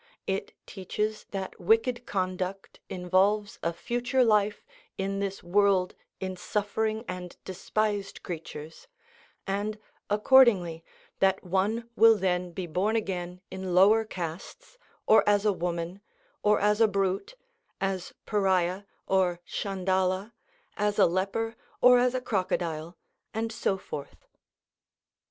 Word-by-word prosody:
It 195 0 -3
teaches 210 +3 -3
that 195 -1 -5
wicked 235 +6 +2
conduct 185 0 -3
involves 195 +4 +1
a 170 - 0
future 245 +8 0
life 210 -2 +2 0.3
in 195 +1 -2
this 195 -1 -3
world 190 0 +3 0.3
in 185 0 -4
suffering 215 +4 -2
and 180 -1 -6
despised 200 +1 -2
creatures, 160 - -8 0.6
and, 205 +2 -2 0.3
accordingly, 210 -7 +5 0.4
that 195 -1 +2
one 200 +5 0
will 225 0 +7
then 180 -2 0
be 180 +1 -4
born 185 +7 0
again 180 -4 -3
in 190 -1 -3
lower 210 +4 +6
castes, 180 - -7 0.3
or 220 - +6
as 205 0 +3
a 210 - +4
woman, 175 +1 -3 0.4
or 210 0 +3
as 210 +2 +2
a 225 - +7
brute, 195 - -1 0.4
as 195 -2 -2
Pariah 190 -2 +1 0.2
or 185 -2 +2
Tschandala, 190 +1 -1 0.4
as 210 0 0
a - - +6
leper, 195 +6 -1 0.2
or 250 0 +7
as 250 +1 +2
a 255 - -1
crocodile, 170 -6 -2 0.4
and 225 0 -1
so 195 -3 0
forth. 145 -6 -8
195 Hz, 120 wpm, -28 LUFS, 180-215 Hz, 0.6 s, will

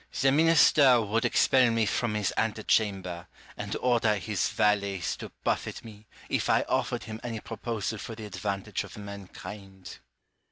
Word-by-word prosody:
Rousseau. - - -7
The 135 0 +4
minister 145 -4 +5
would 110 +3 0
expel 125 +1 +4
me 115 -1 +1
from 105 +2 -1
his 105 -2 0
ante 110 -1 -1
chamber, 95 -6 0 0.3
and - - -4
order 115 -4 +2
his 100 -2 -1
valets 100 -3 0
to - - -8
buffet - - -2
me, 105 -1 -13 0.2
if - - -1
I - - +4
offered - - -1
him 110 0 -7
any 115 -2 -4
proposal 115 -1 -4
for 115 - -7
the 110 -1 -8
advantage 100 +1 -3
of 100 - -11
mankind. 100 -1 -10
105 Hz, 160 wpm, -28 LUFS, 100-115 Hz, 0.3 s, minister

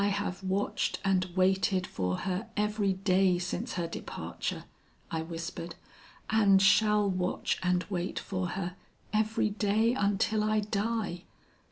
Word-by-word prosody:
'I - - +3
have 200 -2 -2
watched 190 +2 -1
and 190 -1 +3
waited 190 0 +2
for 90 - -2
her 190 +3 -2
every 210 -1 +1
day 185 -1 +3
since 180 +6 -3
her 175 -2 -1
departure,' 165 - -5 0.5
I 160 - -1
whispered, 165 +1 -6 0.5
'and 205 -3 +5
shall 210 +1 +4
watch 185 -1 -1
and 180 -1 +1
wait 185 -2 -3
for 185 -2 -2
her, 180 -2 -3 0.4
every 215 0 +1
day 215 +3 +2
until 205 -1 +1
I 215 0 +2
die. 205 -3 -2
195 Hz, 135 wpm, -30 LUFS, 180-210 Hz, 0.5 s, and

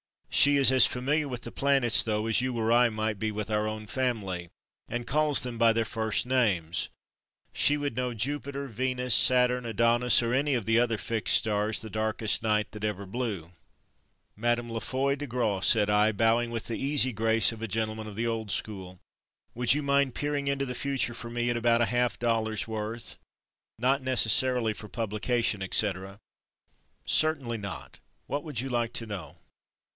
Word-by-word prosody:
She 145 0 +6
is 140 -2 +5
as 130 -2 +7
familiar 145 +4 -1
with 125 -3 -6
planets 135 -4 +4
though 110 -1 -1
as 115 +1 +2
you 130 -1 -2
or 115 0 0
I 120 0 +5
might 110 -2 -3
be 110 +1 -2
with 105 0 -5
our 105 0 0
own 110 0 -5
family, 105 -9 -3 0.4
and 120 0 -4
calls 150 +2 +3
them 125 -3 -6
by 115 -1 +5
their 115 0 0
first 110 0 -1
names. 95 -9 0 0.6
She 150 - +3
would 145 -4 -3
know 125 0 -2
Jupiter, 140 +3 -2
Venus, 125 +1 -1
Saturn, 125 0 +3
Adonis 115 +2 +3
or 115 +1 -1
any 140 +1 +1
of 115 -5 -2
the 115 +1 +3
other 120 -2 +1
fixed 110 0 0
stars 105 -1 +1
the 110 - -8
darkest 110 0 0
night 105 -1 0
that 105 0 -6
ever 100 -2 -3
blew. 100 -6 -5 0.9
"Mme. 120 +1 0
La 115 0 -3
Foy 135 +4 -1
De 145 +1 -6
Graw," 115 -5 -1
said 105 +1 +3
I, 105 +1 +3
bowing 115 +3 +2
with 115 -1 -5
the 115 - -4
easy 140 -2 +2
grace 115 0 +2
of 115 -1 -10
a 115 - -3
gentleman 110 +1 -3
of 105 - -8
the 115 +3 -2
old 115 -2 -3
school, 95 -4 -4 0.5
"would 125 +2 +3
you 150 - -2
mind 140 -2 +1
peering 145 -1 -2
into 140 0 -1
the 125 - -3
future 135 -3 -1
for 120 0 -8
me 120 0 -2
about 120 0 +2
a - - +4
half 120 0 +1
dollar's 110 -2 -1
worth, 110 +1 -4 0.6
not 130 +4 +1
necessarily 125 -2 +2
for 105 - -10
publication, 115 0 -2
et 95 - -4
cetera." 95 -1 -1 0.9
"Certainly 140 -7 +1
not. 100 -2 -7 0.3
What 145 +1 -4
would 145 -8 -4
you 135 - -5
like 120 -1 -1
to 115 - -3
know?" 100 -7 -8
115 Hz, 180 wpm, -28 LUFS, 110-125 Hz, 0.9 s, as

